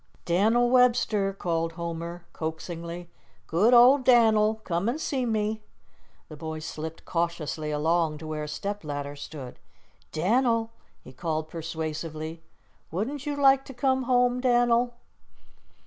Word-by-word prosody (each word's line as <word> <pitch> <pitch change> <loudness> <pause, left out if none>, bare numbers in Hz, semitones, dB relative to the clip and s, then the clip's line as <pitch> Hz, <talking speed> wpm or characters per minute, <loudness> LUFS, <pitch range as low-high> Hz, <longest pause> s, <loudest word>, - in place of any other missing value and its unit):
"Dan'l 220 +8 +3
Webster," 235 -5 +3
called 165 -3 -2
Homer, 170 +1 -5
coaxingly, 170 +2 -5 0.4
"good 195 +9 +3
old 250 +3 +7
Dan'l, 220 -3 +5
come 175 +4 -1
an' 255 - -1
see 265 -5 -2
me." 215 -1 -1 0.7
The 155 - -10
boy 160 +1 -5
slipped 155 +1 -7
cautiously 165 -3 -2
along 155 +1 +1
to 160 - -9
where 155 -1 -4
a - - -7
step 200 +7 -4
ladder 145 -1 -4
stood. 145 -3 -9 0.5
"Dan'l," 230 +6 +1 0.3
he 130 - -12
called 160 0 -3
persuasively, 160 0 -5 0.5
"wouldn't 255 - -3
you 290 - -1
like 270 -1 +5
to 270 - -10
come 260 +1 +1
home, 250 0 +2
Dan'l?" 240 -1 +3
175 Hz, 130 wpm, -27 LUFS, 160-240 Hz, 0.7 s, old